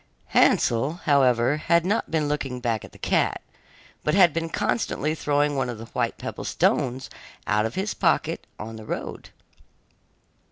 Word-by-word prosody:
Hansel, 120 Hz, +6 st, +3 dB
however, 130 Hz, -2 st, +3 dB
had 170 Hz, +2 st, +2 dB
not 210 Hz, +4 st, 0 dB
been 155 Hz, -2 st, 0 dB
looking 135 Hz, -4 st, -2 dB
back 115 Hz, -3 st, -1 dB
at -, -, -11 dB
the -, -, -16 dB
cat, -, -, +1 dB, 0.6 s
but 150 Hz, -, +1 dB
had 180 Hz, -6 st, +6 dB
been 165 Hz, 0 st, -2 dB
constantly 155 Hz, -, -1 dB
throwing 145 Hz, -1 st, +1 dB
one 135 Hz, -2 st, -1 dB
of 120 Hz, -, -5 dB
the 115 Hz, -, -8 dB
white -, -, -1 dB
pebble -, -, -6 dB
stones 130 Hz, +1 st, 0 dB, 0.4 s
out 105 Hz, +1 st, +2 dB
of 115 Hz, -, -9 dB
his 195 Hz, +3 st, -1 dB
pocket -, -, 0 dB
on 110 Hz, +1 st, -7 dB
the 110 Hz, -, -10 dB
road. -, -, -5 dB
140 Hz, 160 wpm, -25 LUFS, 120-160 Hz, 0.6 s, had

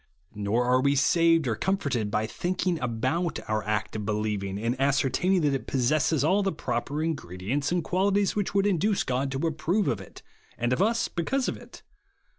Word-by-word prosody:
Nor 105 Hz, +4 st, 0 dB
are 125 Hz, +1 st, +3 dB
we 140 Hz, +1 st, +2 dB
saved 165 Hz, +1 st, +3 dB
or 115 Hz, -, 0 dB
comforted 140 Hz, -, -1 dB
by 105 Hz, +1 st, 0 dB
tldnhing 180 Hz, -, -2 dB
about 130 Hz, +8 st, -1 dB
our 110 Hz, 0 st, 0 dB
act 105 Hz, 0 st, -2 dB
of 105 Hz, -, -3 dB
believing 105 Hz, -2 st, -2 dB
and 115 Hz, +4 st, -1 dB
ascertain 140 Hz, +6 st, +2 dB
ing 185 Hz, -, +3 dB
that 145 Hz, -2 st, +2 dB
it 135 Hz, -, -3 dB
possesses 135 Hz, +2 st, +1 dB
all 190 Hz, +6 st, +3 dB
the 195 Hz, -1 st, 0 dB
proper 150 Hz, -1 st, -3 dB
in 165 Hz, 0 st, 0 dB
gredients 105 Hz, -, -3 dB
and 175 Hz, -1 st, +1 dB
qualities 200 Hz, +2 st, +1 dB
which 205 Hz, -1 st, -2 dB
would 195 Hz, 0 st, +3 dB
induce 200 Hz, +1 st, +1 dB
God 130 Hz, +1 st, -1 dB
to 135 Hz, +4 st, -2 dB
approve 165 Hz, +6 st, 0 dB
of 105 Hz, -4 st, -1 dB
it, 95 Hz, -, -13 dB, 0.3 s
and 120 Hz, +2 st, 0 dB
of 145 Hz, -, 0 dB
us 230 Hz, +3 st, +2 dB
because 250 Hz, +10 st, -1 dB
of -, -, -1 dB
it. -, -, -14 dB
140 Hz, 195 wpm, -27 LUFS, 115-180 Hz, 0.3 s, are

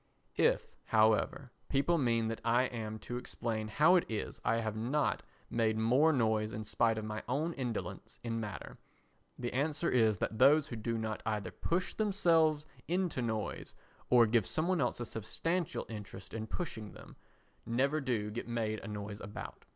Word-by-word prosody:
If, -, -, +2 dB
however, 110 Hz, +4 st, +2 dB, 0.2 s
people 155 Hz, +5 st, +2 dB
mean 115 Hz, -4 st, +2 dB
that 115 Hz, -, -4 dB
I 120 Hz, +2 st, +3 dB
am 110 Hz, -4 st, -4 dB
to 120 Hz, -, -3 dB
explain 115 Hz, -3 st, -3 dB
how 150 Hz, +11 st, +5 dB
it 175 Hz, -, +1 dB
is 110 Hz, -2 st, -4 dB
I -, -, +2 dB
have 110 Hz, -2 st, -1 dB
not 125 Hz, +7 st, 0 dB, 0.3 s
made 110 Hz, -2 st, +1 dB
more 125 Hz, +8 st, +4 dB
noise 110 Hz, -5 st, +1 dB
in 110 Hz, -, -4 dB
spite 115 Hz, +1 st, +2 dB
of 110 Hz, -, -3 dB
my 110 Hz, 0 st, -4 dB
own 155 Hz, +6 st, 0 dB
indolence 125 Hz, -6 st, -5 dB
in 115 Hz, -1 st, -2 dB
matter, 105 Hz, -8 st, -6 dB, 0.6 s
the 120 Hz, -1 st, -4 dB
answer 150 Hz, +5 st, 0 dB
is 110 Hz, -4 st, +4 dB
that 110 Hz, +4 st, -3 dB
those 150 Hz, +1 st, +6 dB
who 120 Hz, -, -4 dB
do 115 Hz, +1 st, -2 dB
not 110 Hz, -1 st, -3 dB
either 105 Hz, -4 st, -1 dB
push 175 Hz, +2 st, -1 dB
the 220 Hz, -, 0 dB
themselves 165 Hz, -7 st, +3 dB, 0.2 s
into 175 Hz, -6 st, 0 dB
noise, 110 Hz, -3 st, -3 dB, 0.3 s
or 120 Hz, -2 st, +7 dB
give 110 Hz, -3 st, +2 dB
some 160 Hz, +2 st, 0 dB
one 185 Hz, -4 st, +2 dB
else 125 Hz, -, 0 dB
a 120 Hz, -, -3 dB
substantial 165 Hz, -, -2 dB
interest 105 Hz, -3 st, -8 dB
in 110 Hz, 0 st, -4 dB
pushing 110 Hz, -7 st, -5 dB
them, -, -, -12 dB, 0.5 s
never 140 Hz, +6 st, +1 dB
do 115 Hz, -6 st, -1 dB
get 115 Hz, +2 st, -5 dB
made 110 Hz, -2 st, -1 dB
a -, -, -9 dB
noise 105 Hz, 0 st, -6 dB
about. 105 Hz, +1 st, -8 dB
115 Hz, 175 wpm, -33 LUFS, 110-145 Hz, 0.6 s, or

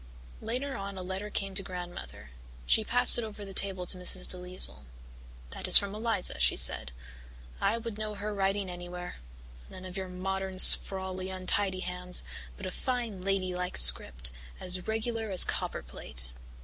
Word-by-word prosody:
Later 255 Hz, +5 st, -4 dB
on 200 Hz, 0 st, -7 dB
a 185 Hz, -, -7 dB
letter 190 Hz, +3 st, -6 dB
came 195 Hz, -1 st, -4 dB
to 195 Hz, -, +1 dB
Grandmother; 175 Hz, -, -10 dB, 0.3 s
she 220 Hz, -, +1 dB
passed 245 Hz, +2 st, +4 dB
it -, -, -4 dB
over 210 Hz, -1 st, -9 dB
the 195 Hz, -, -11 dB
table 190 Hz, -2 st, -1 dB
to 180 Hz, +1 st, 0 dB
Mrs. 180 Hz, 0 st, +1 dB
DeLisle. 180 Hz, -, -2 dB, 0.7 s
"That -, -, -7 dB
is -, -, +12 dB
from 200 Hz, 0 st, 0 dB
Eliza," 215 Hz, -, 0 dB
she -, -, +2 dB
said. -, -, +1 dB, 0.7 s
"I 205 Hz, +4 st, 0 dB
would 230 Hz, -2 st, -8 dB
know 215 Hz, -1 st, -5 dB
her 210 Hz, +1 st, -6 dB
writing 195 Hz, 0 st, -2 dB
anywhere 180 Hz, 0 st, -9 dB, 0.5 s
none 185 Hz, 0 st, -12 dB
of 185 Hz, 0 st, -8 dB
your 190 Hz, -1 st, -6 dB
modern 190 Hz, +1 st, -5 dB
sprawly, 190 Hz, 0 st, +5 dB
untidy 185 Hz, 0 st, 0 dB
hands, 180 Hz, 0 st, 0 dB, 0.3 s
but 195 Hz, -, -9 dB
a 185 Hz, -, -5 dB
fine 235 Hz, -6 st, -4 dB
lady 190 Hz, -1 st, -2 dB
like 180 Hz, 0 st, -5 dB
script, 60 Hz, 0 st, +6 dB, 0.3 s
as 180 Hz, 0 st, -4 dB
regular 225 Hz, 0 st, -3 dB
as 185 Hz, -2 st, +3 dB
copperplate. -, -, -2 dB
190 Hz, 160 wpm, -28 LUFS, 180-205 Hz, 0.7 s, is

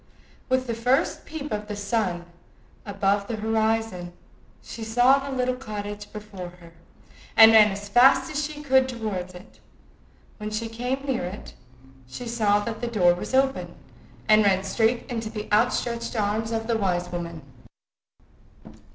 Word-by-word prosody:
With 255 Hz, 0 st, +1 dB
the 235 Hz, -, -3 dB
first 245 Hz, +4 st, 0 dB
peep 300 Hz, -2 st, -6 dB
of 210 Hz, 0 st, -3 dB
the 210 Hz, -, -5 dB
sun 200 Hz, -4 st, -2 dB, 0.6 s
above 200 Hz, 0 st, 0 dB
the 235 Hz, -, -3 dB
horizon, 220 Hz, -4 st, -1 dB, 0.5 s
she 230 Hz, -, -8 dB
saw 245 Hz, +5 st, +4 dB
the 275 Hz, 0 st, -6 dB
little 255 Hz, 0 st, +1 dB
cottage 205 Hz, -4 st, -7 dB
before 210 Hz, -4 st, -8 dB
her, 170 Hz, -1 st, -15 dB, 0.6 s
and 225 Hz, 0 st, +10 dB
ran 215 Hz, -1 st, +7 dB
as 200 Hz, +1 st, -6 dB
fast 265 Hz, +5 st, +5 dB
as 300 Hz, 0 st, -1 dB
she 295 Hz, 0 st, -6 dB
could 265 Hz, -2 st, +3 dB
run 240 Hz, -, -8 dB
towards 185 Hz, -5 st, -4 dB
it, 180 Hz, +5 st, -14 dB, 0.8 s
When 210 Hz, -1 st, -5 dB
she 220 Hz, +1 st, -3 dB
came 250 Hz, +4 st, -3 dB
near 265 Hz, -8 st, -1 dB
it, 185 Hz, +4 st, -8 dB, 0.5 s
she 240 Hz, -, -8 dB
saw 210 Hz, -3 st, +2 dB
that 220 Hz, +1 st, -5 dB
the 240 Hz, -, -2 dB
door 185 Hz, -7 st, +3 dB
was 180 Hz, +8 st, -4 dB
open, 270 Hz, 0 st, +1 dB, 0.5 s
and 215 Hz, 0 st, +6 dB
ran 190 Hz, -2 st, +2 dB
straight 225 Hz, +5 st, 0 dB
into 230 Hz, -4 st, -4 dB
the 215 Hz, -1 st, -6 dB
outstretched 235 Hz, +1 st, 0 dB
arms 215 Hz, +1 st, -1 dB
of 225 Hz, 0 st, -2 dB
the 230 Hz, 0 st, 0 dB
wise 180 Hz, -3 st, -1 dB
woman. 170 Hz, -3 st, -6 dB
220 Hz, 160 wpm, -25 LUFS, 205-245 Hz, 0.8 s, and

